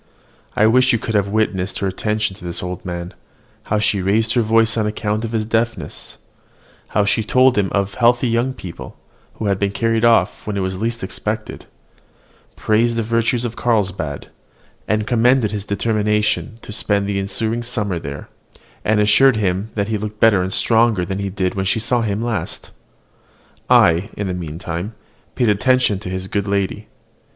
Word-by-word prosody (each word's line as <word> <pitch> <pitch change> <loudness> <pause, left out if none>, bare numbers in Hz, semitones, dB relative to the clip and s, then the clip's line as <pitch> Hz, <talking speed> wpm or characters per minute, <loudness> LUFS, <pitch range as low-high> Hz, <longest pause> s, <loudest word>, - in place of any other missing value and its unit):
I 110 - +4
wish 130 +3 +4
you - - +3
could 115 0 -4
have 100 -2 +2
witnessed 100 -3 -1
her 100 - -2
attention 105 +1 -1
to 95 - -15
this 85 0 -4
old 90 -1 -5
man, 85 -1 -5 0.5
how 105 - 0
she 105 -2 +1
raised 110 +4 +1
her 120 - +3
voice 115 0 +3
on 110 -2 0
account 105 +1 -2
of 115 - -3
his 110 -2 -1
deafness; 115 +1 -2 0.7
how 105 - +1
she 100 +2 +1
told 130 +3 +4
him 100 -2 +1
of 100 -1 0
healthy 120 +2 +3
young 120 +3 0
people, 90 -8 -9 0.4
who 110 - -5
had 100 -2 +1
been 100 - +1
carried 115 +2 0
off 115 -5 +3
when 105 -1 -2
it - - 0
was 95 +1 -3
least 115 -1 -2
expected; 105 +3 -4 0.9
praised 115 +2 +1
the 115 - 0
virtues 115 +2 0
of 120 -1 -4
Carlsbad, 95 -11 -1 0.6
and 110 0 0
commended 120 0 +3
his 105 -2 -4
determination 105 +2 0
to - - -8
spend 100 -1 0
the 100 -1 -1
ensuing 110 +4 -2
summer 105 -7 -2
there; 70 -1 -7 0.6
and 110 0 +2
assured 110 +5 +5
him 100 0 -1
that 100 0 -1
he 110 -2 -1
looked 105 0 -6
better 110 -4 +5
and 95 +1 -2
stronger 110 -5 +2
than 95 +2 -4
he 100 -1 -2
did 95 -1 -1
when 95 -1 -2
she 100 - +1
saw 120 +2 0
him 105 0 -1
last. 120 -2 -4 1.0
I, 85 +6 +5
in 100 - -2
the 95 - -2
meantime, 85 +4 -5 0.4
paid 120 -3 +2
attention 125 -1 +2
to 95 - -7
his 95 0 -4
good 100 +1 -2
lady. 100 +1 -1
105 Hz, 180 wpm, -19 LUFS, 100-115 Hz, 1.0 s, assured